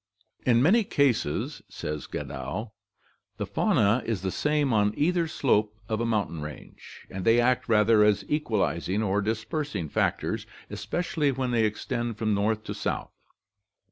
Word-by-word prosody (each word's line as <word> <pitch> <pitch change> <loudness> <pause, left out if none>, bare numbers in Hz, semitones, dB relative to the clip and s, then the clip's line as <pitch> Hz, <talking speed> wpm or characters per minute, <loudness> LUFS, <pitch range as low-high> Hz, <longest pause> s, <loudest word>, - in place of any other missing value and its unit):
"In 120 0 +5
many 215 +9 +5
cases," 135 - 0
says 75 -1 -5
Gadow, 70 - -5 0.7
"the - - -2
fauna 105 +5 +2
is 105 -5 -2
the 95 - -1
same 150 -1 +1
on 105 -1 +2
either 170 +2 +2
slope 105 -9 +1
[of 110 0 -1
a 115 - 0
mountain 100 -8 -1
range], 75 0 -10
and 95 -1 -5
they 115 +3 +5
act 125 0 +2
rather 110 0 +5
as 105 -1 +3
equalizing 105 - 0
or 100 0 +1
dispersing 110 - -2
factors, - - -1 0.2
especially 140 - -1
when 130 -1 -2
they 115 -2 +3
extend 115 +1 -2
from 110 -2 0
north 105 +2 0
to - - -5
south. - - -3
110 Hz, 145 wpm, -27 LUFS, 105-130 Hz, 0.7 s, In